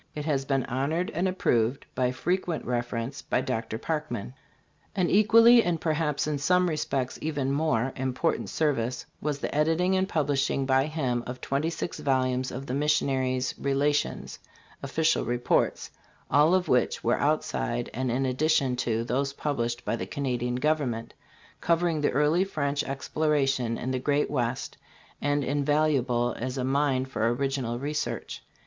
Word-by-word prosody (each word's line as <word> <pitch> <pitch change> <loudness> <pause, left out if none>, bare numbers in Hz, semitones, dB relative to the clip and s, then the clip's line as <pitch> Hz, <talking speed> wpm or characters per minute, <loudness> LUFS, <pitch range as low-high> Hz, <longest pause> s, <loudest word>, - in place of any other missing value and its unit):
It 150 -1 -4
has 140 -4 0
been 135 -2 0
honored 150 +8 -1
and 175 +4 0
approved 125 -9 +1
by. 125 -1 +1
frequent 175 +5 -2
reference 120 +2 -3
by - - 0
Dr. 115 -4 -3
Parkman. 130 -6 -3 0.6
An 185 -3 +1
equally, 230 +3 +7
and 175 -2 0
perhaps 155 -2 0
in 150 -2 -1
some 180 +5 +3
respects 140 -5 -2
even 145 -4 -1
more, 135 -4 +1
important 130 +5 -1
service 130 -6 -1 0.2
was 150 -1 -1
the - - -4
editing 165 +5 +2
and 190 +1 +1
publishing 140 -4 0
by 135 +1 +3
him 130 -6 -1
of 125 +1 -6
twenty 140 +4 -1
six 165 -1 -5
volumes 130 -3 +1
of 130 +2 -6
the 125 - -4
missionaries' 130 -3 +1
" - - -27
Relations" 145 +2 0 0.4
(official 155 +4 +1
reports), 120 0 0 0.4
all 150 +6 +5
of 185 -1 +1
which 125 -1 +1
were 120 - +2
outside 140 -5 0
and 130 +1 -2
in 130 +3 0
addition 135 0 +2
to 115 -2 0
those 135 +3 -1
published 120 -5 -2
by - - 0
the - - -5
Canadian 125 -3 -2
government, 130 -5 -1 0.5
covering 170 -2 +1
the 145 - +2
early 150 +6 +3
French 145 -6 -1
ex 135 0 -5
plorations 135 -6 +1
in 130 - -3
the 130 - -1
great 145 +2 +1
West 130 -2 -2 0.4
and 145 0 +1
invaluable 140 -4 +1
as 130 +2 -3
a 130 - -1
mine 135 -1 +1
for 115 -4 0
original 130 -2 -1
research. 150 +4 -3
140 Hz, 155 wpm, -27 LUFS, 125-155 Hz, 0.6 s, equally